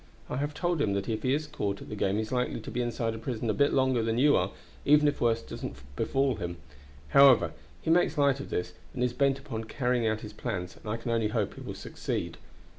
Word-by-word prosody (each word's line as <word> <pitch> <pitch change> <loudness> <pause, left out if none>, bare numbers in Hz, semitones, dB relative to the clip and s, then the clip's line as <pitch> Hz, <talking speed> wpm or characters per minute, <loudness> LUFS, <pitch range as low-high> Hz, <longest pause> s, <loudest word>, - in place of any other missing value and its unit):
I 125 - -1
have 145 +2 -2
told 175 -2 0
him 100 -7 +2
that 100 0 -2
if 110 -1 -1
he 130 - +1
is 155 +1 -2
caught 100 -9 -3
at - - -10
the - - -5
game 100 -1 +1
he 110 - +1
is 110 - -8
likely 125 -2 0
to - - -8
be 125 - -1
inside 115 -1 -1
a 110 - -6
prison 115 -1 -2
a - - -1
bit 140 +4 +3
longer 130 -3 +3
than 115 0 0
you 145 +3 +5
are, - - +2 0.3
even 150 +1 +5
if 145 - 0
worse 115 -1 +2
doesn't - - -6 0.2
befall 135 +2 +1
him. 85 -2 -4 0.5
However, 140 - +7 0.3
he 160 - +1
makes 165 -2 +3
light 140 -2 +3
of 140 - -7
this, 90 - -2 0.2
and 125 - 0
is 125 -1 +1
bent 140 0 +2
upon 125 -6 -6
carrying 125 0 0
out 110 0 0
his 105 -1 -8
plans, 95 -6 -4
and 110 - -9
I 115 - -1
can 115 +1 -4
only 115 -2 +2
hope 105 - -1
he - - -11
will - - -6
succeed. - - -4
120 Hz, 255 wpm, -29 LUFS, 110-140 Hz, 0.5 s, However